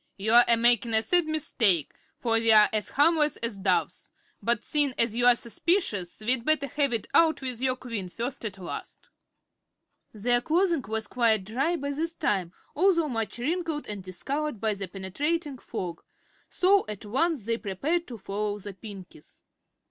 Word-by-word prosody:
"You're 220 +5 +5
a 235 - +4
makin' 235 -1 +3
a 220 - +4
sad 350 +3 +3
mistake, 225 - +1 0.2
for 235 - -3
we're 220 -2 +6
as 215 -1 -2
harmless 300 0 +3
as 230 -3 -3
doves; 190 -2 -1 0.3
but 235 -1 +1
seein' 290 -4 +2
as 230 -1 +1
you're 245 0 +5
suspicious 235 - -1
we'd 240 +2 +1
better 310 0 +2
have 280 -1 0
it 230 -2 -2
out 320 -4 +3
with 250 -2 -3
your 260 -1 +1
Queen 230 -7 -5
first 240 +8 -5
as 205 -3 -5
last." 185 - -8 1.0
Their 240 +3 +2
clothing 335 +1 +1
was 220 0 -2
quite 225 -3 +1
dry 270 - -1
by 285 -3 -4
this 325 +4 -3
time, 185 -4 -1 0.2
although 335 -2 +2
much 225 -3 -3
wrinkled 320 +3 -2
and 205 -2 -6
discolored 270 - -4
by 220 0 0
the 195 -1 -6
penetrating 275 - -3
fog, 175 -8 -6 0.5
so 390 +2 +3
at 210 -1 -7
once 275 - 0
they 230 0 0
prepared 290 - -2
to 240 - -8
follow 205 +1 -3
the 205 0 -8
Pinkies. 195 -2 -13
235 Hz, 165 wpm, -27 LUFS, 210-295 Hz, 1.0 s, we're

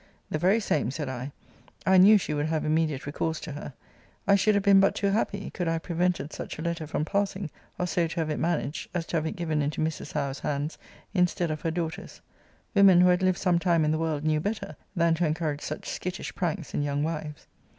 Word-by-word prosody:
The 155 - 0
very 190 +7 +4
same, 150 - 0
said 145 +1 -4
I; 130 +2 -5 0.5
I 190 0 +6
knew 210 +4 +8
she 180 - -2
would 145 +1 0
have 160 -1 -1
immediate 155 -3 0
recourse 155 +3 -2
to 165 - -6
her. 145 -1 -7 0.5
I 200 - +6
should 200 +2 +4
have 200 - +2
been 200 -1 +7
but 195 +1 +4
too 200 - +1
happy, 200 -1 -1
could 175 - -3
I 165 - +2
have 165 - -3
prevented 175 -3 -1
such - - -6
a 160 - -5
letter 170 -2 -2
from 150 0 -1
passing, 195 -3 -1 0.3
or 180 - 0
so 175 -1 +1
to 165 - -7
have 155 -1 -1
it 150 - -2
managed, 160 -3 -1
as 170 -2 -1
to 170 - -1
have 160 0 -1
it - - -4
given 160 -4 -1
into 145 +1 -2
Mrs. 155 -1 -2
Howe's 140 -2 -2
hands, 145 +2 -3 0.3
instead 180 -3 +1
of 155 - -4
her 165 - 0
daughter's. 160 -1 -4 0.5
Women 195 -4 +7
who 180 - +6
had 180 +1 +3
lived 185 -1 +2
some 180 -3 +2
time 170 -3 +2
in 150 - +2
the 155 - 0
world 155 -3 -1
knew 155 0 +2
better, 200 -3 -3 0.2
than 170 -2 +3
to 170 +2 +1
encourage 155 -2 -2
such 155 - -5
skittish 180 0 -4
pranks 175 -2 -3
in - - 0
young 145 0 0
wives. 155 -2 -4
165 Hz, 235 wpm, -27 LUFS, 150-180 Hz, 0.5 s, knew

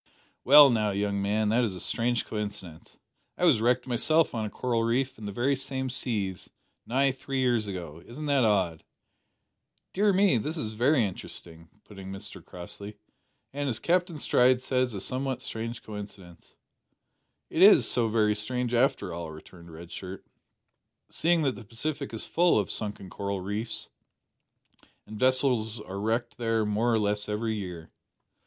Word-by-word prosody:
"Well 145 0 +9
now, 110 -3 +1
young 100 0 -1
man, 105 +2 +1
that 120 +3 +3
is 105 -5 -1
a - - -7
strange 120 +5 0
coincidence. 100 -6 -6 0.4
I - - +1
was 110 - +4
wrecked 125 +1 +2
myself 155 +6 +2
on 110 -2 -2
a - - -4
coral 120 +1 -1
reef 125 +3 0
in 105 - -6
the - - -4
very 130 +7 +1
same 130 -1 -4
seas, 105 -8 -3 0.4
nigh 135 +3 +2
three 135 +1 -4
years 120 -4 +2
ago. 85 -5 -7
Isn't 150 +6 -7
that 140 -3 +3
odd?" 95 -7 +1 1.1
"Dear 205 +2 +3
me, 190 - +4
this 155 +10 -4
is 110 -8 -4
very 125 +2 +3
interesting," 85 -3 -6
put 100 -2 -13
in 95 0 -8
Mr 95 +1 -7
Crossley; 100 +4 -9 0.6
"and, 145 0 -2
as 115 - 0
Captain 175 - 0
Stride 125 -2 +3
says, 130 -2 -1
a - - -3
somewhat 130 +3 -2
strange 115 -1 -5
coincidence." 100 -5 -10 1.0
"Is - - +8
it - - +3
so 120 -2 +2
very 105 -1 +2
strange, 125 +3 -2
after 120 - +1
all," 85 -1 -5
returned 85 +2 -13
Red 85 +2 -11
Shirt, 95 0 -8 0.9
"seeing 170 0 +2
that 135 -3 +1
the 120 - -10
Pacific 140 +7 -4
is 110 - -3
full 175 -4 +3
of 105 - 0
sunken 105 -3 -3
coral 100 -1 -3
reefs, 105 +4 -3 1.2
and 105 -1 -9
vessels 125 -4 +2
are 100 -2 -7
wrecked 115 +4 -1
there 115 -2 +1
more 105 +3 +1
or 115 - +3
less 105 0 -1
every 110 +2 -1
year?" 90 -6 -6
115 Hz, 165 wpm, -28 LUFS, 100-130 Hz, 1.2 s, Well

